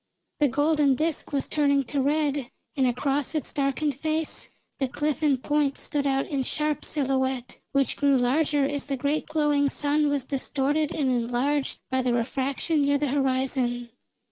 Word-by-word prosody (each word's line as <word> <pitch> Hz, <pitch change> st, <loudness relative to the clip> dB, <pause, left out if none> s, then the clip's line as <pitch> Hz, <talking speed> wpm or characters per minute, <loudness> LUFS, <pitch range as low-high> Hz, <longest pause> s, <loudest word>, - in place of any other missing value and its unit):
The 295 Hz, -, +4 dB
golden 290 Hz, +1 st, +2 dB
disk 315 Hz, +3 st, -1 dB
was 280 Hz, -2 st, 0 dB
turning 280 Hz, -2 st, +2 dB
to 275 Hz, +2 st, -2 dB
red 285 Hz, -2 st, 0 dB, 0.3 s
and 265 Hz, -3 st, +2 dB
across 275 Hz, +4 st, 0 dB
its 305 Hz, -, -2 dB
darkened 285 Hz, +1 st, 0 dB
face 315 Hz, +2 st, -2 dB, 0.3 s
the 270 Hz, -, +1 dB
cliff 295 Hz, +3 st, -2 dB
and 280 Hz, -4 st, +2 dB
Point 295 Hz, -2 st, +1 dB
stood 285 Hz, -1 st, -1 dB
out 270 Hz, 0 st, +1 dB
in 280 Hz, -3 st, -2 dB
sharp 300 Hz, +3 st, -1 dB
silhouette, 265 Hz, -3 st, -1 dB
which 275 Hz, -1 st, +1 dB
grew 280 Hz, -2 st, +3 dB
larger 285 Hz, +3 st, +2 dB
as 285 Hz, 0 st, -2 dB
the 275 Hz, -1 st, -2 dB
great 285 Hz, +4 st, -1 dB
glowing 295 Hz, -2 st, +2 dB
sun 295 Hz, +1 st, +1 dB
was 285 Hz, -3 st, 0 dB
distorted 285 Hz, +2 st, 0 dB
and 290 Hz, -4 st, -1 dB
enlarged 250 Hz, +4 st, 0 dB
by 260 Hz, 0 st, +2 dB
the 250 Hz, -1 st, +1 dB
refraction 270 Hz, +6 st, 0 dB
near 285 Hz, 0 st, +3 dB
the 290 Hz, -1 st, -1 dB
horizon. 260 Hz, -3 st, 0 dB
280 Hz, 165 wpm, -26 LUFS, 265-295 Hz, 0.3 s, The